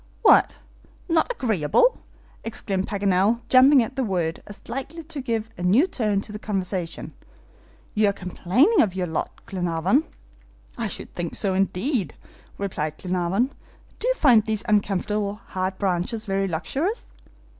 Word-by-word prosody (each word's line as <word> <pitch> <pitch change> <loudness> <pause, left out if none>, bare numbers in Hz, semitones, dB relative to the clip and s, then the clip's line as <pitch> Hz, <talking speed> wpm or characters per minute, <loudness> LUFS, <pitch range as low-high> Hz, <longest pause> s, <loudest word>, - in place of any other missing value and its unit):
"What! - - +5 0.5
not 330 +6 +2
agreeable!" 245 - +2 0.4
exclaimed 195 -4 -2
Paganel, 200 +2 +1
jumping 260 0 +7
at 265 +4 -7
the 265 - 0
word 175 -6 -1
as 205 - -11
likely 285 +6 -5
to 305 -2 -6
give 225 -3 -2
a - - -5
new 200 - +4
turn 215 - 0
to 210 - -8
the 210 - -6
conversation. 185 -5 -3 0.8
"You 210 -1 +3
are - - -1
complaining 200 - +2
of 190 -4 +1
your 185 -1 -1
lot, 160 -2 -2 0.2
Glenarvan." 180 - 0 0.7
"I 230 -2 -2
should - - -7
think 170 -2 -4
so, 195 -3 0
indeed," 195 - 0 0.4
replied 155 -6 -3
Glenarvan. 185 +7 0 0.5
"Do 485 - -1
you - - +2
find 245 - +5
these 215 -1 -2
uncomfortable 205 0 0
hard 185 0 -2
branches 190 +3 -1
very 195 -1 0
luxurious?" 270 - -3
205 Hz, 145 wpm, -24 LUFS, 185-250 Hz, 0.8 s, jumping